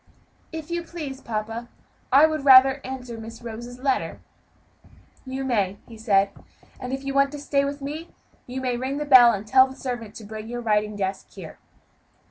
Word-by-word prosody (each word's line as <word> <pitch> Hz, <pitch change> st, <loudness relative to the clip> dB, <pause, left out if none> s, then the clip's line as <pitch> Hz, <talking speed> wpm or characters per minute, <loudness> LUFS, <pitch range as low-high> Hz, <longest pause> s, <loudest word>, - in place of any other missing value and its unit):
"If 320 Hz, 0 st, -7 dB
you 345 Hz, 0 st, -1 dB
please, 305 Hz, -6 st, -7 dB
papa, 225 Hz, +1 st, -4 dB, 0.4 s
I 280 Hz, +4 st, +7 dB
would 310 Hz, -2 st, -1 dB
rather 270 Hz, 0 st, +7 dB
answer 250 Hz, -3 st, -7 dB
Miss 225 Hz, +1 st, -10 dB
Rose's 240 Hz, +2 st, -8 dB
letter." 265 Hz, 0 st, -1 dB, 1.1 s
"You 265 Hz, +1 st, -4 dB
may," 205 Hz, -7 st, 0 dB
he 230 Hz, -, -12 dB
said, 200 Hz, -3 st, +2 dB, 0.5 s
"and 255 Hz, -, -6 dB
if 270 Hz, +1 st, -4 dB
you 275 Hz, 0 st, -3 dB
want 275 Hz, 0 st, +3 dB
to 295 Hz, -, -6 dB
stay 280 Hz, -1 st, +1 dB
with 280 Hz, 0 st, -4 dB
me, 305 Hz, +4 st, -6 dB, 0.4 s
you 255 Hz, +1 st, -5 dB
may 250 Hz, -2 st, -1 dB
ring 260 Hz, +3 st, -3 dB
the 295 Hz, -, -3 dB
bell 255 Hz, -4 st, +8 dB
and 200 Hz, -1 st, -4 dB
tell 260 Hz, +3 st, +6 dB
the 265 Hz, -, -11 dB
servant 240 Hz, -6 st, -6 dB
to 225 Hz, -, -9 dB
bring 215 Hz, +1 st, -8 dB
your 240 Hz, +1 st, -5 dB
writing 210 Hz, -2 st, 0 dB
desk 195 Hz, -1 st, -3 dB
here." -, -, -10 dB
255 Hz, 185 wpm, -24 LUFS, 225-275 Hz, 1.1 s, bell